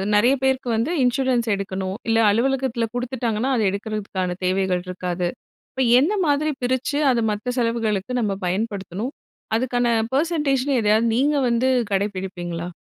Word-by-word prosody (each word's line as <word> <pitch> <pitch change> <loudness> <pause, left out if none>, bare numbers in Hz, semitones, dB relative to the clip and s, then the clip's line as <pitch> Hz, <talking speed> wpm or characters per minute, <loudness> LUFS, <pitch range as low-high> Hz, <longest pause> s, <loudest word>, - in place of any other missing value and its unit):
நெறைய 235 +6 +5
பேருக்கு 265 -2 +1
வந்து 230 +8 0
இன்சூரன்ஸ் 250 -1 +1
எடுக்கணும். 190 -1 -4
இல்ல, 225 - +3
அலுவலகத்துல 245 +1 +1
குடுத்துட்டாங்கன்னா, 245 -1 -1
அத - - +1
எடுக்கறதுக்கான 200 -3 -3
தேவைகள் 185 -1 +1
இருக்காது. 180 -1 -2 0.4
இப்ப 265 - -1 0.2
என்ன 315 +10 +2
மாதிரி 295 +1 +2
பிரிச்சு, 260 +3 0
அத 240 - +1
மத்த 230 +4 -3
செலவுகளுக்கு 230 -3 -1
நம்ப 205 -3 0
பயன்படுத்தணும்? 200 - -3 0.4
அதுக்கான 245 0 0 0.3
பர்சன்டேஜ்னு 285 -4 +1
எதையாவது 215 +2 +3
நீங்க 285 +5 +2
வந்து 235 +2 +2 0.3
கடைபிடிப்பீங்களா? 185 -4 -3
230 Hz, 125 wpm, -22 LUFS, 195-260 Hz, 0.4 s, நெறைய